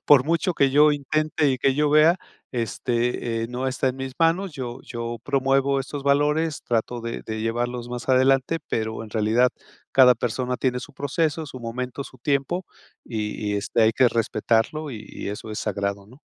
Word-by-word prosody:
por 140 -3 +7
mucho 170 +4 +1
que 140 -3 +3
yo 150 +2 +6
intente 155 +1 0
y 130 - -1
que 135 +2 +2
yo 150 +1 +2
vea 155 +4 +6 0.4
este, 120 0 -1
eh, 115 - -3
no 125 +2 -3
está 130 0 0
en 130 - -3
mis 135 -1 -5
manos. 165 +3 +2
Yo 130 -4 -5
yo 120 -1 -5
promuevo 135 0 +2
estos 140 +1 -6
valores, 150 +3 +2
trato 120 +1 -1
de 115 0 -5
de 110 0 -4
llevarlos 120 +2 -2
más 125 +1 -6
adelante, 135 +4 +3
pero 110 0 -2
en 110 - -10
realidad 110 +4 +3 0.4
cada 125 -2 +7
persona 125 +2 -2
tiene 125 0 0
su - - -10
proceso, 155 +3 -1
su 130 - -8
momento, 125 +3 -5
su 130 - -14
tiempo 140 +8 0 0.4
y 105 -2 -3
y - - 0
este, 105 +3 +1
hay 110 0 +5
que 130 +3 +4
respetarlo 115 +6 0
y 110 -2 -8
y - - -6
eso 105 +2 -6
es 105 - -4
sagrado, 100 -1 -2
¿no? 125 +6 -17
130 Hz, 185 wpm, -24 LUFS, 115-140 Hz, 0.4 s, por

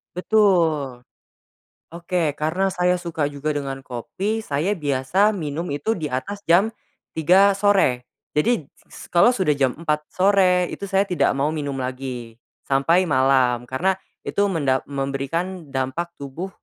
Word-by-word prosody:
Betul. 170 - +2 0.9
Oke 170 -3 -1
karena 180 +6 0
saya 180 0 +2
suka 165 -4 -2
juga 145 +1 -4
dengan 135 -2 -4
kopi, 195 - -3
saya 160 0 -1
biasa 165 +5 +1
minum 160 -2 -4
itu 220 +10 -1
di 155 - -3
atas 130 +11 -4
jam 185 +6 +5 0.4
3.00 185 +6 +5
sore, 195 -11 +2 0.2
jadi 165 +3 +1 0.2
s - - -13
kalau 175 +7 +6
sudah 190 -11 +2
jam 135 -3 0
4.00 150 -2 -2
sore, 185 -2 +3
itu 200 - -6
saya 195 +1 +2
tidak 165 -8 +1
mau 145 +3 0
minum 145 -3 -3
lagi 125 -3 -6 0.2
sampai 165 +7 +3
malam 130 -5 +2
karena 180 +9 +1 0.3
itu - - -2
mendap 140 -8 +1
memberikan 140 +6 -3
dampak 135 +6 -3
tubuh 140 +7 -6
155 Hz, 135 wpm, -22 LUFS, 135-185 Hz, 0.9 s, kalau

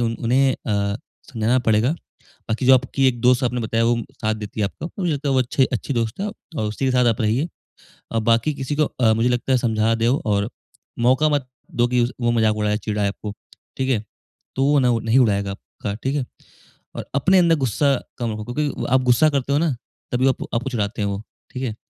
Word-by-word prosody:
उन 115 - -1
उन्हें 130 +3 +3
अ, 100 -2 -1 0.4
समझाना 115 +2 +2
पड़ेगा। 115 +4 +2 0.6
बाकी 115 +4 -1
जो 130 - +8
आपकी 135 +1 +1
एक 120 -2 0
दोस्त 125 +1 +4
आपने 125 -1 0
बताया 115 +1 0
वो 120 0 +2 0.2
साथ 110 0 0
देती 105 0 -7
है - - +3
आपको 160 +11 -6
मुझे 175 -3 +1
लगता 145 0 -3
है - - +2
वो 130 - +3
अच्छे 130 +1 +2
अच्छी 130 +4 -2
दोस्त 115 - -2
है 210 - -1 0.3
और - - 0
उसी 110 +6 -3
के 130 - +2
साथ 125 -1 +3
आप 115 -1 +1
रहिए। 115 +9 +1 0.7
अ, 115 - +1
बाकी 115 +6 +2
किसी 135 +1 -3
को 150 - +3 0.2
अ, 110 -2 +5
मुझे 115 +2 +2
लगता 125 +2 0
है 130 - +4
समझा 110 -1 +1
देओ 115 +4 +1
और 100 0 +1 0.6
मौका 150 +4 +4
मत 145 -3 0 0.3
दो 120 0 +3
कि 125 0 +2
उस 120 - -1
वो 120 0 +2
मज़ाक 110 -2 +2
उड़ाए 105 0 0
चिढ़ाए 105 -1 -1
आपको, 105 +1 -6 0.4
ठीक 130 0 -1
है? 110 -4 0 0.5
तो 135 - +1
वो 145 +1 +4
न 120 -3 +2
नहीं 115 +3 +3
उड़ाएगा 100 -4 +2
आपका, 100 +1 -7
ठीक 135 +2 0
है? 135 - -1 0.7
और - - -5
अपने 185 +7 +4
अंदर 170 -2 +4
गुस्सा 135 +2 +1 0.3
कम 115 -2 -1
रखो 105 0 -6
क्योंकि 150 -1 -2
आप 130 - +5
गुस्सा 130 +5 +4
करते 140 -1 -1
हो - - +3
ना, 165 -3 +1 0.4
तभी 125 +2 +2
आपको 130 - -2
आपको 125 +3 -1
चिढ़ाते 105 -2 -2
हैं 100 - 0
वो, 100 +1 -3 0.3
ठीक 130 - -5
है? 115 -5 -3
120 Hz, 225 wpm, -22 LUFS, 110-135 Hz, 0.7 s, जो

